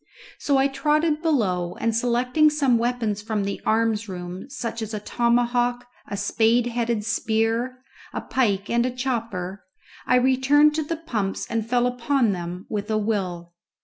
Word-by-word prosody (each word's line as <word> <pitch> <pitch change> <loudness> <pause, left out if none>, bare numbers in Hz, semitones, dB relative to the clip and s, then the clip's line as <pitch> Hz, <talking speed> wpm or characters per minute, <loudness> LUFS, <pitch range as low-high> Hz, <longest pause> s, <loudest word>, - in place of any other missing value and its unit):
So 280 -1 +2
I 270 +1 +4
trotted 300 +3 +1
below, 190 - 0
and 230 -1 0
selecting 250 +6 +3
some 275 -6 +2
weapons 230 -4 -1
from 215 -1 -2
the 200 0 -4
arms 225 -1 +1
room, 180 +4 -7
such 230 -4 -5
as 220 0 -4
a - - -3
tomahawk, 240 +2 +1 0.2
a 200 - -4
spade 225 +4 +2
headed 235 -3 -1
spear, 225 +2 0 0.3
a - - -4
pike 205 -6 0
and 235 0 +2
a 255 - 0
chopper, 225 -7 -3 0.4
I - - +4
returned 265 +4 +4
to 315 +1 -1
the 330 +2 -3
pumps 215 -12 -3
and 230 -1 -2
fell 245 0 +2
upon 250 -1 +1
them 180 0 -5
with 210 -1 -4
a 215 - +1
will. 185 -5 -2
235 Hz, 160 wpm, -24 LUFS, 210-255 Hz, 0.4 s, I